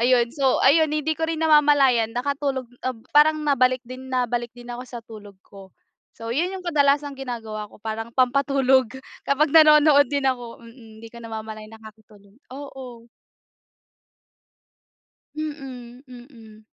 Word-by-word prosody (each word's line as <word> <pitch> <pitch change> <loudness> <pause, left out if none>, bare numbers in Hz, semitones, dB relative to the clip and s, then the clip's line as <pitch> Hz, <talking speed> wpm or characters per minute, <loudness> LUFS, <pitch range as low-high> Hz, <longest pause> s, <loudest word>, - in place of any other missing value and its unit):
ayun. 245 -1 +3
So, 270 -3 +1
ayun 310 +2 +4
hindi 305 +1 -1
ko - - -5
rin 325 -1 -3
namamalayan 285 -7 +4
nakatulog 270 0 -2 0.2
ob 255 -2 -2 0.2
parang 305 +1 +5
nabalik 255 -2 +2
din 255 +1 -10
nabalik 245 -2 -2
din 245 0 -12
ako 245 - -7
sa 240 -1 -8
tulog 210 -3 -12
ko. 195 -1 -15 0.5
So, 230 0 -7
yun 345 +6 0
yung 375 - -7
kadalasang 285 -2 +1
ginagawa 225 -5 -6
ko - - -18
parang 225 +1 -5
pampatulog 260 -1 +2 0.4
kapag 290 +2 +1
nanonood 300 -2 +6
din 285 -1 -1
ako. 245 -3 -3
Mm, 225 -2 -16
'di 230 - -10
ko - - -10
na - - -8
namamalayan, 220 0 -8
nakakatulog 215 -2 -17 0.2
oo. 260 -4 -10 2.3
Mm, 260 -5 -8
mm. 235 -4 -15
255 Hz, 140 wpm, -23 LUFS, 230-285 Hz, 2.3 s, nanonood